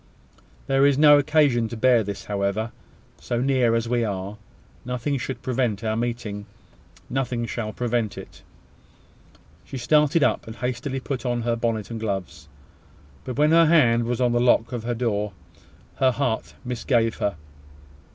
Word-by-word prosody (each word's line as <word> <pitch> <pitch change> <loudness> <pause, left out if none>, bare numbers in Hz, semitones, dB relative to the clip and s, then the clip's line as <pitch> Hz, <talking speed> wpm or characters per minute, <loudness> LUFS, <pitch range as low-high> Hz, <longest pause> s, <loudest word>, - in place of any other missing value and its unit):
There 135 0 +2
is 140 -1 +4
no 145 -1 +7
occasion 145 -6 +2
to 115 - -6
bear 120 -1 +4
this, 100 0 -6
however. 100 +2 -2 0.5
So 120 - -2
near 125 -3 +2
as 115 0 -1
we 120 0 +1
are, 100 -1 -4 0.5
nothing 125 +3 -2
should 130 +2 -5
prevent 120 -5 -1
our 110 -1 0
meeting 115 -3 -4 0.6
nothing 125 -2 -2
shall 110 -1 -4
prevent 120 -2 -2
it." - - -11 1.2
She 135 - -7
started 150 +5 +3
up, - - +1
and 110 - -7
hastily 130 +2 -3
put 130 0 -4
on 120 -2 -1
her 120 0 0
bonnet 115 -2 -2
and 115 - -4
gloves: 90 -6 -4 0.8
but 125 - -5
when 150 +1 +4
her 165 0 +6
hand 120 -8 +4
was 120 +1 -2
on 125 -1 +2
the 120 - +2
lock 120 -1 +3
of 120 -2 -5
her 120 0 -1
door, 105 -4 -1 0.6
her 130 - +4
heart 130 -3 -2
misgave 120 -2 0
her. 100 -3 -1
120 Hz, 160 wpm, -24 LUFS, 110-130 Hz, 1.2 s, no